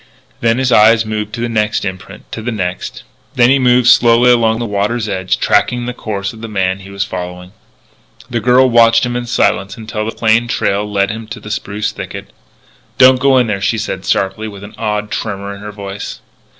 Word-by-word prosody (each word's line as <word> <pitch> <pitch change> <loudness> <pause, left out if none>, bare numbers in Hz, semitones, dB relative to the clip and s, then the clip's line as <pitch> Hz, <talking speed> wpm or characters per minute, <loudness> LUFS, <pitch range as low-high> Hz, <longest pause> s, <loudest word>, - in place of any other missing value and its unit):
Then 115 0 +2
his 130 -1 0
eyes 110 +1 +5
moved 105 -1 -3
to 115 - -4
the 120 - 0
next 105 -2 -1
imprint; 95 +1 -8
to 110 - -5
the 120 +2 -3
next. 90 -4 -4 0.3
Then 120 +1 +5
he 140 - +4
moved 125 -1 +3
slowly 120 +1 +5
along 115 -2 +3
the 120 - -3
water's 105 +2 -1
edge, 95 -2 -1
tracking 120 -1 +1
the 125 - -4
course 100 -4 -4
of 110 - -12
the 115 - -5
man 95 -3 -1
he 100 0 -12
was 100 0 -2
following. 90 -1 -7 0.8
The 120 -2 -2
girl 125 +3 +4
watched 115 -1 +4
him 120 0 -3
in 120 0 -3
silence 100 -4 0
until 110 -1 -4
the 110 - -3
plain 115 +1 +2
trail 105 -2 -1
led 100 0 +1
him 110 0 -7
to 115 +2 -8
the 105 - -9
spruce 105 0 -3
thicket. - - -8 0.6
"Don't 130 0 +6
go 135 0 +4
in 125 - +4
there!" 105 -3 -2
she 105 +4 0
said 95 -3 -4
sharply, 100 +3 -1
with 100 -2 -10
an 100 - -10
odd 105 -1 -3
tremor 100 -2 -4
in 100 - -11
her 105 0 -7
voice. 100 -1 -7
110 Hz, 210 wpm, -15 LUFS, 100-120 Hz, 0.8 s, Don't